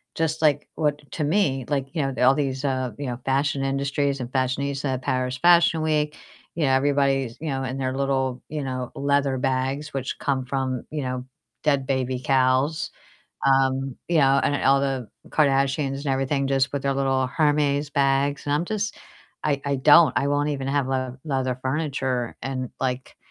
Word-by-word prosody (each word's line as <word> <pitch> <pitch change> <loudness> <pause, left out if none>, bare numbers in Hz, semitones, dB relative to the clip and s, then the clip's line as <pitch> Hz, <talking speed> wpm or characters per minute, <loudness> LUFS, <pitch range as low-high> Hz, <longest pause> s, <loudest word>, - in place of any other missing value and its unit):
just 160 0 -1
like 145 -2 +2
what 150 -2 -1
to 155 - -2
me, 145 - +1
like, 140 -2 0
you 155 - 0
know, 135 -1 -1
all 130 +2 +7
these, 135 -1 -2
uh, 130 -2 -1
you 145 - -5
know, 120 0 -4
fashion 135 +1 +1
industries 140 0 0
and 125 0 -5
fashionista, 135 0 -1
Paris 130 0 -1
Fashion 170 +1 +5
Week, 150 -1 0 0.4
you 165 - -1
know, 135 - +2
everybody's, 135 -2 +1
you 160 - -3
know, 135 -1 -2
in 130 +1 -3
their 130 0 -2
little, 135 -2 -1
you 150 -1 -3
know, 130 -2 -4
leather 140 -1 +1
bags 135 +3 -1
which 135 -1 -3
come 135 -3 -1
from, 130 -1 -2
you 150 -2 -3
know, 125 0 -3 0.4
dead 140 -3 +2
baby 130 -2 -1
cows. 130 +3 +2 0.6
Um, 135 -1 +2
you 170 -2 +2
know, 135 -1 +5
and 145 - 0
all 135 +1 +5
the 135 -4 -2 0.2
Kardashians 135 -1 +2
and 140 +1 -7
everything 135 +1 0
just 135 0 +1
with 140 - -2
their 140 -1 0
little 135 -1 +1
Hermes 145 0 +1
bags 140 0 +1
and 145 - 0
I'm 150 +4 +1
just 205 +1 -3 0.5
I 145 -2 0
I 140 0 0
don't 145 +2 +6
I 140 - +2
won't 145 +1 +1
even 135 -2 -3
have 140 -1 +1
le 130 -1 -2
leather 130 -3 -1
furniture 130 -4 -2
and 130 -2 -3
like, 130 -1 -3
135 Hz, 180 wpm, -24 LUFS, 130-145 Hz, 0.6 s, all